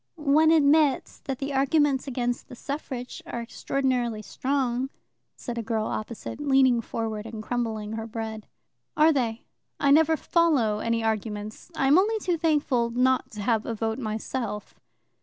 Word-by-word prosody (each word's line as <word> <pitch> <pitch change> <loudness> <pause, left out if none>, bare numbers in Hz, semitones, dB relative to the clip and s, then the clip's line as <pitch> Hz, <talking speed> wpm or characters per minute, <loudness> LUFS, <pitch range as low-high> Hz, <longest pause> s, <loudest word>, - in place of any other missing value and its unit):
"One 305 0 +4
admits 300 -3 +3
that 270 -2 -3
the 275 +1 -4
arguments 275 0 +2
against 245 -2 -2
the 250 - -10
suffrage 260 -2 -5
are 240 - -4
extraordinarily 240 -2 -1
strong," 260 +2 -1 0.5
said 240 -2 -5
a - - -1
girl 220 -1 -1
opposite, 220 +5 -5
leaning 265 -4 +4
forward 220 -1 -4
and 220 -1 -7
crumbling 220 -3 -2
her 225 0 -4
bread. 220 -1 -5 0.5
"Are 315 +1 +6
they? 235 -4 -1 0.4
I 280 - +3
never 320 +2 +5
follow 285 - +2
any 230 0 0
arguments. 215 - -3
I 270 - +1
am 285 +6 +6
only 440 +3 +2
too 370 -4 0
thankful 290 -7 +2
not 255 +2 +2
to 210 -1 -5
have 225 -1 +1
a 230 - -2
vote 225 +2 -2
myself." 220 -1 -4
245 Hz, 155 wpm, -26 LUFS, 225-280 Hz, 0.5 s, Are